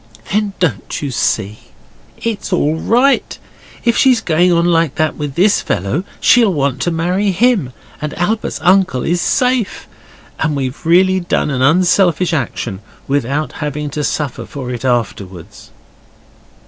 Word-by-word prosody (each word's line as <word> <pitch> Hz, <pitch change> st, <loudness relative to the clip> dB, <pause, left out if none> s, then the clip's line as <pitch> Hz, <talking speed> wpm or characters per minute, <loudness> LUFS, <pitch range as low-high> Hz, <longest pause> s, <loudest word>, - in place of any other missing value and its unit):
'Then 210 Hz, -1 st, 0 dB
don't 150 Hz, -, -2 dB
you 140 Hz, -, -3 dB
see 105 Hz, -3 st, -1 dB, 0.6 s
it's 225 Hz, -3 st, -4 dB
all 160 Hz, -4 st, +1 dB
right. 245 Hz, +11 st, +1 dB, 0.5 s
If 235 Hz, -1 st, +3 dB
she's 255 Hz, -3 st, +4 dB
going 175 Hz, -2 st, +2 dB
on 170 Hz, 0 st, +2 dB
like 165 Hz, -4 st, +2 dB
that 155 Hz, -1 st, 0 dB
with 145 Hz, -3 st, -5 dB
this 200 Hz, +4 st, +3 dB
fellow 100 Hz, -, -2 dB, 0.2 s
she'll 235 Hz, -4 st, +4 dB
want 140 Hz, -2 st, -1 dB
to -, -, +1 dB
marry 180 Hz, +5 st, 0 dB
him, 195 Hz, -, +2 dB, 0.3 s
and 150 Hz, 0 st, -4 dB
Albert's 210 Hz, +2 st, -1 dB
uncle 185 Hz, -8 st, +3 dB
is 175 Hz, +1 st, 0 dB
safe. 250 Hz, 0 st, 0 dB, 0.5 s
And 155 Hz, -2 st, 0 dB
we've 135 Hz, +4 st, -4 dB
really 185 Hz, +2 st, +4 dB
done 175 Hz, -4 st, -1 dB
an 130 Hz, -2 st, -2 dB
unselfish 175 Hz, +3 st, +3 dB
action 120 Hz, -, -3 dB, 0.3 s
without 140 Hz, +2 st, -1 dB
having 150 Hz, 0 st, -3 dB
to 150 Hz, +1 st, -3 dB
suffer 145 Hz, -3 st, -3 dB
for 130 Hz, -3 st, -6 dB
it 120 Hz, -1 st, -5 dB
afterwards. 105 Hz, -6 st, -3 dB
160 Hz, 145 wpm, -16 LUFS, 135-190 Hz, 0.6 s, she's